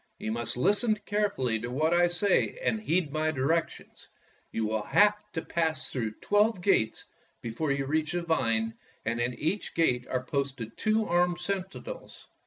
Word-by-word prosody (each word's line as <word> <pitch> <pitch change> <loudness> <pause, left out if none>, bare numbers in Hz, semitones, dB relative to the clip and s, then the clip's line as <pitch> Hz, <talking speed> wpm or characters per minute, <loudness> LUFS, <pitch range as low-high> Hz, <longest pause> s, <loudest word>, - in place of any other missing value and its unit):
You 110 - -4
must 115 +1 -2
listen 210 - +3
carefully 200 - 0
to 120 +3 -5
what 155 +6 +1
I 175 0 +5
say 175 - +1
and 220 - +1
heed 170 -7 0
my 155 0 +1
directions. 155 +3 -2 0.4
You 115 - -1
will 110 0 -1
have 210 - +3
to 160 - -3
pass 160 -4 -1
through 115 -5 -2
twelve 205 0 +3
gates 175 - +1 0.4
before 120 +6 -2
you 140 0 0
reach 155 +3 0
the 175 -1 -1
vine, 115 -9 +1 0.3
and 115 +1 -1
at 120 0 -1
each 170 +10 -2
gate 125 -7 +2
are 130 0 -2
posted 135 -4 -3
two 215 0 +1
armed 175 0 +2
sentinels. 195 - -5
160 Hz, 165 wpm, -29 LUFS, 125-185 Hz, 0.4 s, I